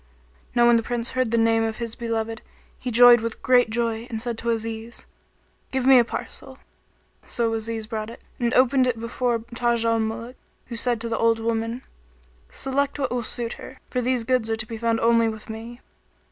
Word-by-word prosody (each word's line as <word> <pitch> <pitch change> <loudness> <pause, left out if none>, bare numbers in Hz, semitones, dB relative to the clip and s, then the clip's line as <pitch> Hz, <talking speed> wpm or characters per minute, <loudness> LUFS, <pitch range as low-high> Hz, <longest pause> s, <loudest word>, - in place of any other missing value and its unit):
Now 240 -1 +5
when 235 0 +6
the - - +1
Prince 235 0 -3
heard 255 -2 0
the 235 - +1
name 225 0 +3
of 225 -1 -2
his 235 -2 -3
beloved, 225 -1 -3 0.4
he 255 - -4
joyed 240 +1 +8
with 230 0 -5
great 250 -2 +4
joy 230 0 -2
and 225 -2 -4
said 240 0 -3
to 235 - -2
Aziz, 225 0 -4 0.6
"Give 265 -1 -1
me 265 -1 +8
such 235 - +2
a - - -17
parcel." - - -6 0.7
So 230 -1 0
Aziz 225 0 -2
brought 215 -1 -4
it 230 - -11 0.2
and 240 -1 +1
opened 255 0 +4
it 235 -2 -1
before 230 0 -1
Taj 235 -1 +1
al 230 0 +2
Muluk 230 +3 -4 0.3
who 235 - -7
said 240 0 0
to 230 - -2
the 230 - -2
old 230 0 +3
woman, 230 +2 -2 0.7
"Select 280 +1 -1
what 270 -3 -2
will 245 -1 -1
suit 235 0 -2
her; 260 - -10
for 250 - 0
these 250 -1 0
goods 245 -1 +1
are 225 - +1
to 220 -1 -3
be 225 -1 -7
found 230 0 +1
only 230 0 +4
with 220 0 -7
me." 230 +2 -9
230 Hz, 205 wpm, -24 LUFS, 225-245 Hz, 0.7 s, joyed